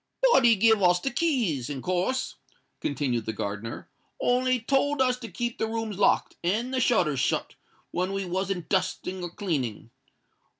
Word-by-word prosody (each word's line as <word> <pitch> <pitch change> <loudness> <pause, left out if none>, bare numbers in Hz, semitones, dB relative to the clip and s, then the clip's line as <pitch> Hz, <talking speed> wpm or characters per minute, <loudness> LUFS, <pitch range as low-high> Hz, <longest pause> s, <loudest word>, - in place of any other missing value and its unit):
"But 265 - +5
he 230 -1 +7
give 220 +1 +4
us 180 -1 +4
the 270 - -2
keys, 235 - 0
in 135 -3 -5
course," 185 +9 -1 0.5
continued 130 -5 -1
the 110 - -1
gardener; 105 +2 -5 0.3
"on'y 255 +1 +2
he 250 - +1
told 275 +4 +1
us 255 -1 +3
to 230 -3 -7
keep 235 +6 -4
the 220 - 0
rooms 220 -3 -4
locked, 200 - +2
and 225 +9 0
the 260 - +1
shutters 160 - +2
shut, - - 0 0.4
when 180 +2 -1
we 195 0 -2
wasn't 185 0 -2
dusting 185 -1 -1
or 175 - -4
cleaning. 140 - -3
195 Hz, 170 wpm, -27 LUFS, 165-240 Hz, 0.5 s, he